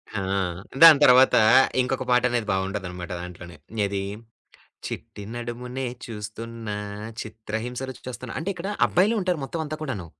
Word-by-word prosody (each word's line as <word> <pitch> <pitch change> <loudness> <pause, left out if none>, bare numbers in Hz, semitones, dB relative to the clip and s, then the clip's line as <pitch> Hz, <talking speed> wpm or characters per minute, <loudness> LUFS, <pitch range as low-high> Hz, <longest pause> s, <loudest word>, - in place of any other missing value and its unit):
హా! 100 - -1 0.6
దాని 160 -3 +10
తరువాత 130 0 +7 0.5
ఇంకొక 130 +1 -1
పాటనేది 120 -2 +2
బాగుంటది 95 +1 -2
అన్నమాట 90 +1 -7
దాంట్లోనే. 85 -2 -9 0.3
ఏది? 100 -1 -2 0.8
చిట్టి 105 - -7
నడుమునే 125 +2 -5 0.2
చూస్తున్నా 110 0 -6 0.5
చిత్రహింస 110 +3 -5
రుచి 130 - -10
చూస్తున్న 125 -1 -6
అంటే 165 +5 -3
ఇక్కడ 180 +3 -5 0.2
అబ్బాయిలే 205 +6 +3
ఉంటారు. 180 -2 0
మొత్తం 160 +4 -4
అంతా 155 +1 -4
కూడాను. 120 - -4
120 Hz, 130 wpm, -25 LUFS, 105-130 Hz, 0.8 s, దాని